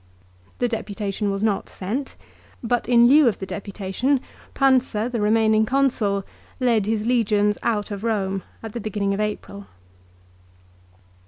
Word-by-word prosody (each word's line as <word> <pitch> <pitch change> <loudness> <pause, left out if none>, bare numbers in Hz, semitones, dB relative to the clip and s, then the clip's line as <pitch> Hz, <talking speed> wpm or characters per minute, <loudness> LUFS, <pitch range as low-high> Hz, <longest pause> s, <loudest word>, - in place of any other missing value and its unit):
The 245 - +1
deputation 210 -3 -3
was 195 +1 -2
not 210 -3 0
sent; 240 +9 -4 0.5
but 240 0 -1
in 240 -1 +6
lieu 290 +2 +6
of 220 - +1
the 190 - -5
deputation 200 +7 -2 0.4
Pausa, 255 -5 +2
the 235 -3 -2
remaining 220 0 +3
Consul, 220 -6 +1 0.3
led 230 -5 +2
his 215 -1 0
legions 210 -4 +2
out 210 -3 -1
of 200 -1 -5
Eome 195 -4 -1 0.2
at 220 -2 -7
the 235 - -4
beginning 200 -1 -1
of 195 - -3
April. 205 -1 -4
215 Hz, 140 wpm, -23 LUFS, 200-240 Hz, 0.5 s, in